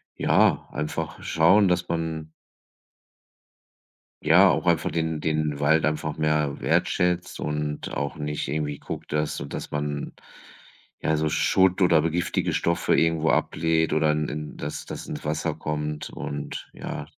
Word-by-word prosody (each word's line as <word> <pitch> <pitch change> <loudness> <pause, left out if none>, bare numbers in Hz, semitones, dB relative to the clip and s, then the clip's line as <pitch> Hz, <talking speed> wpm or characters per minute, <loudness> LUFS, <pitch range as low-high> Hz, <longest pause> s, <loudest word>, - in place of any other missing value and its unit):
ja, - - +3
einfach 80 +2 -4
schauen, 95 +6 +4
dass 90 -1 +1
man 80 -2 -3 1.9
ja, - - +6
auch - - 0
einfach - - +2
den 80 -1 -1
den 75 -2 -1
Wald 75 0 +3
einfach 75 0 -2
mehr 75 -2 0
wertschätzt 90 0 0
und 75 0 -3
auch 70 -1 -2
nicht 75 -1 -3
irgendwie 75 0 -2
guckt, - - -7
dass 75 0 0
sodass 70 - -6
man, 75 0 -3 0.9
ja, 80 - +1
so 75 0 0
Schutt 95 +3 +3
oder 85 -4 +5
be 80 - 0
giftige 85 +2 -1
Stoffe 85 0 +1
irgendwo 80 -1 +2
ablädt 80 -1 +1
oder 75 0 +3
in 75 0 -1
in 75 0 -6
dass 75 - -5
das - - -7
ins - - -6
Wasser 75 +1 -1
kommt 75 -1 -4
und, 70 0 -6
ja. - - -6
75 Hz, 145 wpm, -25 LUFS, 75-80 Hz, 1.9 s, ja